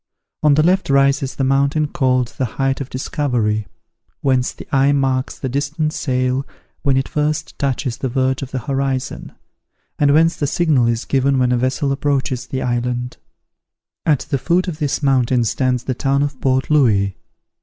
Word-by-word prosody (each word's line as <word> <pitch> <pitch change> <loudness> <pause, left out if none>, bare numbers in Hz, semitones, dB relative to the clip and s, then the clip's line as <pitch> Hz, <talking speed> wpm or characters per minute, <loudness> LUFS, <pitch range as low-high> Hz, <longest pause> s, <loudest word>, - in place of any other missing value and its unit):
On 150 -2 +4
the 155 - +3
left 185 +1 +2
rises 135 -1 +2
the 135 - -1
mountain 140 +3 +2
called 130 -3 +1
the 130 -4 -3
Height 135 0 0
of 135 - -5
Discovery, 120 -6 -1 0.5
whence 130 -2 +1
the - - -12
eye 135 +1 +4
marks 135 -2 0
the 130 - -4
distant 145 +4 -1
sail 130 -2 0 0.4
when 135 -2 +2
it 135 - 0
first 155 +1 -2
touches 130 -2 -1
the 130 - -3
verge 130 +1 0
of 135 - -5
the 130 -2 -4
horizon, 135 -2 -2 0.7
and 145 -1 +4
whence 165 +3 +4
the 145 - -1
signal 150 -6 +2
is 115 -1 -1
given 135 0 +1
when 125 -1 +2
a 125 - +2
vessel 130 +3 0
approaches 135 -2 -1
the 130 - -3
island. 125 0 -2 0.9
At 150 -4 +2
the 140 - -2
foot 175 +7 +1
of 165 -3 -5
this 145 -1 -1
mountain 130 -3 +2
stands 125 +2 0
the 130 - -2
town 140 +3 +1
of 145 -2 -4
Port 130 +1 +1
Louis. 105 -10 +3
135 Hz, 175 wpm, -19 LUFS, 130-145 Hz, 0.9 s, On